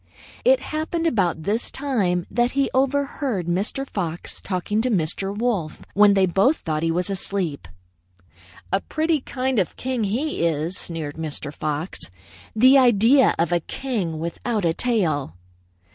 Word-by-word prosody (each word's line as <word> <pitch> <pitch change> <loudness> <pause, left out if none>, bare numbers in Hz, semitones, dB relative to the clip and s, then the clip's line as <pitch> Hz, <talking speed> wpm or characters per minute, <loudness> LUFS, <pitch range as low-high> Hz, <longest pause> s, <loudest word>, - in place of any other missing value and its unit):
"It - - +4
happened 320 +2 -2
about 185 - +1
this 215 +6 -1
time 200 -11 0
that 240 +1 +1
he 275 0 +1
overheard 270 - 0
Mr. 200 +10 -1
Fox 175 -7 -4
talking 200 +3 -1
to 255 - 0
Mr. 195 -1 0
Wolf 210 -10 -1
when 205 0 +6
they 190 -1 +4
both 195 - +3
thought 155 -2 -3
him 165 +1 +1
asleep. 180 - -2 1.1
'A 195 - +2
pretty 315 -2 0
kind 260 -2 -1
of 185 - 0
a - - -35
king, 250 -4 -2
he 245 - -1
is!' 165 +2 0
sneered 160 -5 -5
Mr. 150 -2 -4
Fox. 150 +4 -3 0.6
'The 260 +5 +7
idea 245 +2 +5
of 165 0 +1
a 175 - +3
king 190 - -3
without 175 +6 -2
a 165 - +2
tail!' 165 - 0
200 Hz, 145 wpm, -23 LUFS, 170-255 Hz, 1.1 s, The